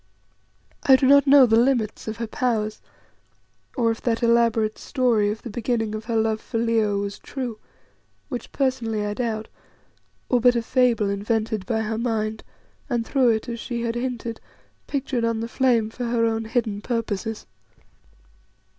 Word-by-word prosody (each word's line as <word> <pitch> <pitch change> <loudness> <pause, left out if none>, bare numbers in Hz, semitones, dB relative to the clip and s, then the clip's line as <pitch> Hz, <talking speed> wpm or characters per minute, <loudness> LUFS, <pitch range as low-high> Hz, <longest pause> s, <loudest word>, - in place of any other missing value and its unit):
I 265 - +6
do 260 - +2
not 280 +2 +6
know 275 -1 +8
the 225 -1 +4
limits 235 -5 0
of 220 -1 -4
her 230 - -3
powers, 215 -2 -1 1.0
or 230 -2 +3
if 225 - -5
that 235 0 -1
elaborate 230 -2 +2
story 240 -6 +1
of 215 +1 -5
the 235 - -6
beginning 225 -1 -1
of 215 0 -5
her 230 0 -2
love 220 -1 +1
for - - -4
Leo 225 -3 +1
was 200 0 -4
true 245 -5 -5 0.7
which 250 -4 -6
personally 235 -6 -1
I 205 - -2
doubt 220 -1 -3 0.8
or 245 -2 +2
but 245 +1 +5
a 235 - 0
fable, 235 -5 +2
invented 215 0 -1
by 220 -1 0
her 220 0 -2
mind, 220 -2 -2 0.5
and 240 -3 0
through 260 -2 +3
it, 220 +2 0
as 235 -1 -5
she 235 0 -4
had 230 -1 -1
hinted, 240 -2 -4 0.5
pictured 270 -4 -2
on 230 -1 0
the 230 - -3
flame 235 -3 +1
for 245 +1 -5
her 230 -1 +1
own 225 0 -1
hidden 220 -3 -1
purposes. 225 -2 -3
230 Hz, 165 wpm, -23 LUFS, 220-245 Hz, 1.0 s, know